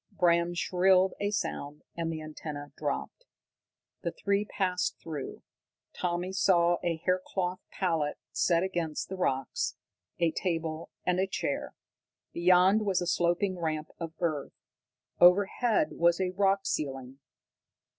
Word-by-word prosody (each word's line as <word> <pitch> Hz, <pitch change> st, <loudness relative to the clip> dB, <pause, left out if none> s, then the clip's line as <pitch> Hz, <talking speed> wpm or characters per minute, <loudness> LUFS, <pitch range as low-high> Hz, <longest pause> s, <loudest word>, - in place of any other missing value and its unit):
Bram 175 Hz, -1 st, +2 dB
shrilled 185 Hz, +1 st, +3 dB
a 205 Hz, -, 0 dB
sound, 150 Hz, -8 st, -3 dB
and 165 Hz, -1 st, -2 dB
the 155 Hz, -1 st, -5 dB
antenna 150 Hz, -2 st, -7 dB
dropped. -, -, -4 dB, 0.8 s
The 170 Hz, -, -2 dB
three 200 Hz, +4 st, 0 dB
passed 185 Hz, -3 st, -1 dB
through. 155 Hz, -4 st, -6 dB, 0.5 s
Tommy 180 Hz, +1 st, -2 dB
saw 175 Hz, -3 st, +4 dB
a 170 Hz, -1 st, +1 dB
hair 185 Hz, 0 st, +2 dB
cloth 185 Hz, -1 st, -2 dB
pallet 165 Hz, -6 st, -1 dB
set 170 Hz, +6 st, +2 dB
against 170 Hz, -5 st, -2 dB
the 190 Hz, -, -4 dB
rocks, 135 Hz, -8 st, -1 dB, 0.4 s
a 170 Hz, -2 st, +2 dB
table, 165 Hz, -2 st, -2 dB, 0.2 s
and 180 Hz, 0 st, +2 dB
a 190 Hz, -, +2 dB
chair. -, -, -3 dB, 0.6 s
Beyond 180 Hz, +4 st, +5 dB
was 195 Hz, -3 st, +1 dB
a 175 Hz, -, -2 dB
sloping 175 Hz, +2 st, +1 dB
ramp 155 Hz, -2 st, -2 dB
of 165 Hz, -1 st, -5 dB
earth. 155 Hz, -5 st, -1 dB, 0.7 s
Overhead 205 Hz, -, +4 dB
was 170 Hz, +1 st, +3 dB
a 185 Hz, -1 st, 0 dB
rock 195 Hz, +1 st, +2 dB
ceiling. 135 Hz, -2 st, -3 dB
175 Hz, 130 wpm, -29 LUFS, 160-190 Hz, 0.8 s, Beyond